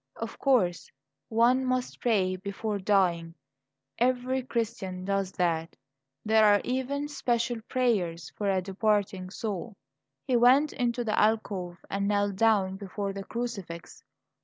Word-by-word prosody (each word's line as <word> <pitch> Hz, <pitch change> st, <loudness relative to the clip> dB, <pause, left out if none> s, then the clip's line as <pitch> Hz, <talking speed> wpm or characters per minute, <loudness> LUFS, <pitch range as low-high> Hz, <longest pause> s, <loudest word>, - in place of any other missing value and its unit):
Of 230 Hz, -, -6 dB
course, 210 Hz, -11 st, +2 dB, 0.4 s
one 240 Hz, +3 st, +3 dB
must 255 Hz, -1 st, -2 dB
pray 195 Hz, -6 st, +2 dB
before 200 Hz, +2 st, -4 dB
dying; 175 Hz, -4 st, +1 dB, 0.6 s
every 255 Hz, +1 st, +1 dB
Christian 220 Hz, -7 st, -3 dB
does 195 Hz, -1 st, -1 dB
that. 165 Hz, -2 st, -1 dB, 0.5 s
There 220 Hz, 0 st, +5 dB
are 205 Hz, -1 st, +6 dB
even 265 Hz, +3 st, -2 dB
special 240 Hz, -4 st, -1 dB
prayers 200 Hz, -10 st, 0 dB
for 205 Hz, -1 st, -1 dB
a 190 Hz, -1 st, +1 dB
departing 195 Hz, -1 st, 0 dB
soul. 205 Hz, +1 st, -5 dB, 0.5 s
He 255 Hz, -, +1 dB
went 260 Hz, +5 st, +5 dB
into 240 Hz, -1 st, -1 dB
the 215 Hz, -2 st, 0 dB
alcove 200 Hz, -5 st, 0 dB
and 200 Hz, 0 st, -1 dB
knelt 205 Hz, -1 st, +1 dB
down 200 Hz, -4 st, +3 dB
before 200 Hz, 0 st, -4 dB
the 195 Hz, 0 st, -6 dB
crucifix. 200 Hz, -9 st, -6 dB
210 Hz, 130 wpm, -28 LUFS, 190-240 Hz, 0.6 s, are